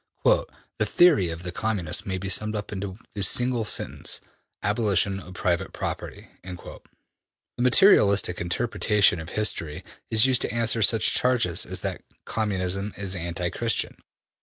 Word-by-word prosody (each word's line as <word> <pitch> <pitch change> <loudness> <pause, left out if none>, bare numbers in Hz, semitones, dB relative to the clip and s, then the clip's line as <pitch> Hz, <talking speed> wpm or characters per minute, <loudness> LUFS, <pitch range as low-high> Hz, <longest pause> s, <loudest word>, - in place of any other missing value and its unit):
``The - - +4 0.3
theory 155 - +4
of 80 +1 -6
the 90 - -5
Communists 95 -5 -2
may 95 -1 -2
be 95 +1 -5
summed 105 +3 +1
up 105 -1 -5
in 100 - -4 0.3
the 105 - -4
single 120 +4 +1
sentence: - - -2 0.4
Abolition 100 -2 +1
of 90 -1 -12
private 90 -1 -1
property.'' - - -5
The 90 -1 -10 0.7
materialistic 105 - +4
interpretation 105 0 +1
of 80 0 -8
history 85 -8 -2 0.2
is 110 +1 +5
used 130 -2 +3
to - - 0
answer 115 0 +1
such 110 +2 +4
charges 120 -9 +2
as - - -3
that - - -4 0.2
Communism 100 -2 -2
is 95 -2 -3
anti 85 0 -3
Christian. 115 -3 -1
100 Hz, 140 wpm, -25 LUFS, 90-115 Hz, 0.7 s, is